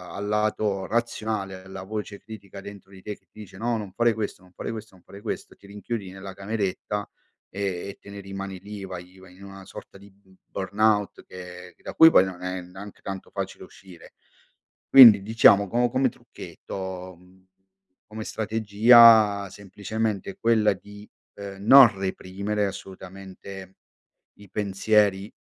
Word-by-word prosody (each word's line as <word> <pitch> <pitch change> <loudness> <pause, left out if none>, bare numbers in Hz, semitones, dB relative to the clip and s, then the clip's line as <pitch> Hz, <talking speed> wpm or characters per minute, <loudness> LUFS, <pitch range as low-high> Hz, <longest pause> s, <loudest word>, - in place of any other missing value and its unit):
al 100 +1 -5
lato 105 -2 -1
razionale, 110 -4 -3
alla 95 0 -9
voce 105 0 -6
critica 100 -2 -11
dentro 100 -1 -12
di 95 -1 -14
te 105 +1 -7
che - - -39
dice: 100 -3 -13
“No, 115 +2 -1
non 105 -3 -7
fare 120 -1 +2
questo 105 -3 -5
non 90 - -21
fare - - -6
questo 110 -3 -9
non 90 - -22
fare 100 - -13
questo”, 110 - -6
ti 100 - -18
rinchiudi 105 -1 -6
nella 95 0 -9
cameretta 100 0 -4 0.4
e 100 - -10 0.3
e 100 - -10
te - - -15
ne 100 0 -9
rimani 95 -1 -7
lì, 100 +1 -9
vai 90 0 -10
vai 95 -1 -16
in 100 - -14
una 95 0 -11
sorta - - -12
di 100 +1 -16
b 95 -1 -26
burnout 105 +1 0
che 90 -1 -11
che - - -30
da - - -7
cui 160 - +8
poi 95 - +5
non 90 -2 -8
è 90 0 -4
neanche 95 +3 -12
tanto 95 -1 -7
facile - - -6
uscire. 90 -3 -16 0.8
Quindi 120 -7 +10
diciamo 100 -2 +5
co 120 +4 +1
come 130 +2 +1
trucchetto, 95 -4 -9
mhmm, 90 +1 -23 0.6
come 110 0 -7
strategia, 110 -1 +5
semplicemente 105 - -4
quella 110 - +2
di, 105 +2 -14 0.3
uhm, 100 -1 -8
non 125 -5 +8
reprimere 100 +2 -3
assolutamente 95 0 -10 0.6
i 100 -1 -15
pensieri, 100 0 +1
100 Hz, 160 wpm, -25 LUFS, 95-110 Hz, 0.8 s, Quindi